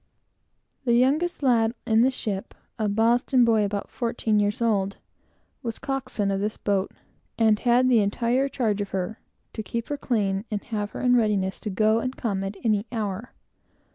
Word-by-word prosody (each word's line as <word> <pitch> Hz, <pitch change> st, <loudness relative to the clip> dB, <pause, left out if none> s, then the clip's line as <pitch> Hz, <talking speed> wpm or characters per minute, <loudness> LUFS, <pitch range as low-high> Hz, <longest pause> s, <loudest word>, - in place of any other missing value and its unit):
The 240 Hz, -3 st, +2 dB
youngest 290 Hz, +7 st, +2 dB
lad 230 Hz, -3 st, +3 dB
in 220 Hz, 0 st, +4 dB
the 255 Hz, -, +5 dB
ship, 210 Hz, -7 st, -4 dB, 0.2 s
a 215 Hz, -1 st, +1 dB
Boston 235 Hz, +4 st, +3 dB
boy 225 Hz, -2 st, +3 dB
about 200 Hz, 0 st, -3 dB
thirteen 225 Hz, -3 st, 0 dB
years 205 Hz, 0 st, 0 dB
old, 200 Hz, -4 st, 0 dB, 0.6 s
was 230 Hz, -4 st, -4 dB
coxswain 270 Hz, -7 st, -2 dB
of 195 Hz, -, 0 dB
this 210 Hz, +2 st, -2 dB
boat, 195 Hz, -2 st, 0 dB, 0.5 s
and 220 Hz, -2 st, +4 dB
had 245 Hz, +1 st, +3 dB
the 245 Hz, -3 st, +5 dB
entire 235 Hz, +6 st, +1 dB
charge 215 Hz, -7 st, 0 dB
of 200 Hz, -, -4 dB
her, 190 Hz, +3 st, -3 dB, 0.3 s
to 220 Hz, -, -4 dB
keep 230 Hz, +2 st, -4 dB
her 290 Hz, -, -2 dB
clean, 200 Hz, -7 st, 0 dB
and 210 Hz, -3 st, -3 dB
have 210 Hz, -3 st, -3 dB
her -, -, -5 dB
in 250 Hz, 0 st, +4 dB
readiness 205 Hz, -5 st, +1 dB
to 215 Hz, -, -4 dB
go 215 Hz, +3 st, +2 dB
and 255 Hz, +2 st, -4 dB
come 200 Hz, -5 st, -2 dB
at 195 Hz, +1 st, -5 dB
any 215 Hz, 0 st, +1 dB
hour. 215 Hz, -1 st, -4 dB
220 Hz, 175 wpm, -25 LUFS, 205-245 Hz, 0.6 s, the